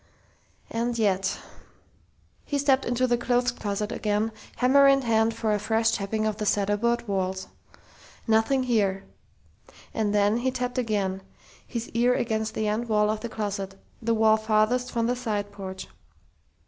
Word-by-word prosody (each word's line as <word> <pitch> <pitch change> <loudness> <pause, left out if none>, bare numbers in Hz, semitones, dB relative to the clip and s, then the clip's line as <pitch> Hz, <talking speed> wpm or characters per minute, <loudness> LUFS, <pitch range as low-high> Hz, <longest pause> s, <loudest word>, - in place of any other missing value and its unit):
And 235 +1 -1
yet 195 -3 +1 1.1
He 285 - -2
stepped 275 -1 +2
into 245 +1 +1
the 240 -1 +1
clothes 245 +1 +1
closet 210 -2 -3
again, 210 +1 0 0.2
hammer 275 +2 +5
in 275 -1 +4
hand 225 -1 +2
for 225 -2 0
a 210 - 0
fresh 225 +2 +1
tapping 215 +1 -1
of 215 -1 -1
the 215 - -3
cedar 205 +1 +2
board 235 +2 0
walls. 190 -1 -2 0.8
Nothing 225 +4 +3
here.... 200 -6 +1 0.9
And 215 -2 0
then 205 +1 +3
he 250 +2 0
tapped 250 0 -2
again, 200 -5 -1 0.5
his 235 -2 -5
ear 240 +2 +2
against 220 -3 -1
the 220 - -1
end 225 +3 -1
wall 210 -1 +3
of 215 - -3
the 235 - -5
closet 200 -3 -4 0.2
the 230 0 +1
wall 220 0 +4
farthest 220 +3 +1
from 230 -2 0
the 245 +1 +1
side 210 -5 -3
porch.... 190 -2 -7
220 Hz, 160 wpm, -26 LUFS, 205-240 Hz, 1.1 s, hammer